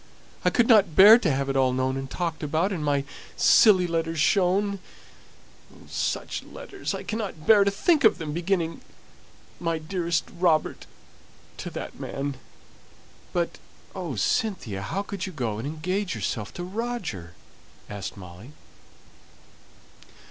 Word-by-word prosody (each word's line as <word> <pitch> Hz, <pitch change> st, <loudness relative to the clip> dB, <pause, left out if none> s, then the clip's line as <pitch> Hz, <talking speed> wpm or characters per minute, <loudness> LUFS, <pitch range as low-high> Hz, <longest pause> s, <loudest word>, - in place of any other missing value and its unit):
I -, -, +4 dB
couldn't 215 Hz, -8 st, +4 dB
bear 215 Hz, +5 st, +9 dB
to 180 Hz, -, 0 dB
have 135 Hz, 0 st, -1 dB
it 135 Hz, -, -2 dB
all 130 Hz, -1 st, +3 dB
known 130 Hz, +1 st, 0 dB
and 135 Hz, 0 st, -5 dB
talked 170 Hz, 0 st, -3 dB
about, 160 Hz, +6 st, 0 dB
and 170 Hz, -6 st, -3 dB
my 145 Hz, -1 st, +1 dB, 0.3 s
silly 190 Hz, -5 st, +6 dB
letters 165 Hz, -1 st, -2 dB
shown 200 Hz, +2 st, +2 dB, 0.9 s
oh, -, -, -17 dB
such -, -, -3 dB
letters! -, -, -6 dB
I -, -, -6 dB
cannot 205 Hz, -8 st, -5 dB
bear 210 Hz, 0 st, +7 dB
to 200 Hz, -, +2 dB
think 285 Hz, -, +2 dB
of 220 Hz, -, +5 dB
them, 155 Hz, -4 st, -5 dB
beginning, 170 Hz, -1 st, -1 dB, 0.8 s
'My 165 Hz, -1 st, -1 dB
dearest 170 Hz, +1 st, -1 dB, 0.2 s
Robert,' 165 Hz, -4 st, +1 dB, 0.7 s
to -, -, -6 dB
that -, -, -7 dB
man 140 Hz, -1 st, -4 dB, 0.5 s
" -, -, -27 dB
"But, 175 Hz, -1 st, -2 dB, 0.3 s
oh, 175 Hz, -8 st, -5 dB
Cynthia, 115 Hz, -, -1 dB
how 190 Hz, -, -3 dB
could 200 Hz, -3 st, -5 dB
you -, -, -6 dB
go 115 Hz, -7 st, -3 dB
and 125 Hz, -, -4 dB
engage 180 Hz, +4 st, -2 dB
yourself 105 Hz, 0 st, -3 dB
to 175 Hz, -, -5 dB
Roger?" 185 Hz, -, -5 dB, 0.5 s
asked 105 Hz, 0 st, -6 dB
Molly. 95 Hz, +8 st, -12 dB
165 Hz, 140 wpm, -25 LUFS, 135-195 Hz, 0.9 s, bear